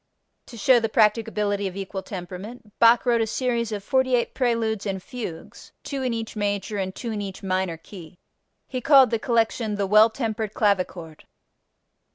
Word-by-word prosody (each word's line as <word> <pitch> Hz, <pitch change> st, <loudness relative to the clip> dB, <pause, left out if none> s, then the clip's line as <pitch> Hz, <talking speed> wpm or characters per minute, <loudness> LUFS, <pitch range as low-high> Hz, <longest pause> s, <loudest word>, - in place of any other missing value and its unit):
To 235 Hz, -, -11 dB
show 245 Hz, +3 st, +5 dB
the 225 Hz, -1 st, -1 dB
practicability 210 Hz, -2 st, +1 dB
of 185 Hz, -, -7 dB
equal 195 Hz, 0 st, -5 dB
temperament 200 Hz, +5 st, -9 dB
Bach 230 Hz, +1 st, +5 dB
wrote 235 Hz, -2 st, +3 dB
a 225 Hz, -, 0 dB
series 235 Hz, -1 st, -1 dB
of 205 Hz, -2 st, -4 dB
48 260 Hz, 0 st, +1 dB
preludes 230 Hz, -5 st, 0 dB
and 195 Hz, -1 st, -2 dB
fugues, 230 Hz, -11 st, -8 dB
two 275 Hz, -2 st, -4 dB
in 255 Hz, -1 st, -1 dB
each 225 Hz, -1 st, -4 dB
major 205 Hz, 0 st, -2 dB
and 190 Hz, -1 st, -3 dB
two 235 Hz, -, -5 dB
in 210 Hz, -1 st, -3 dB
each 195 Hz, -1 st, -7 dB
minor 185 Hz, -3 st, -1 dB
key. 175 Hz, 0 st, -13 dB, 0.5 s
He 255 Hz, -1 st, -4 dB
called 270 Hz, -3 st, +6 dB
the 230 Hz, -, 0 dB
collection 225 Hz, -2 st, 0 dB
"The 200 Hz, -1 st, -1 dB
Well 215 Hz, +3 st, +6 dB
tempered 220 Hz, -2 st, -3 dB
Clavichord." 185 Hz, -6 st, -1 dB
215 Hz, 170 wpm, -24 LUFS, 195-235 Hz, 0.5 s, called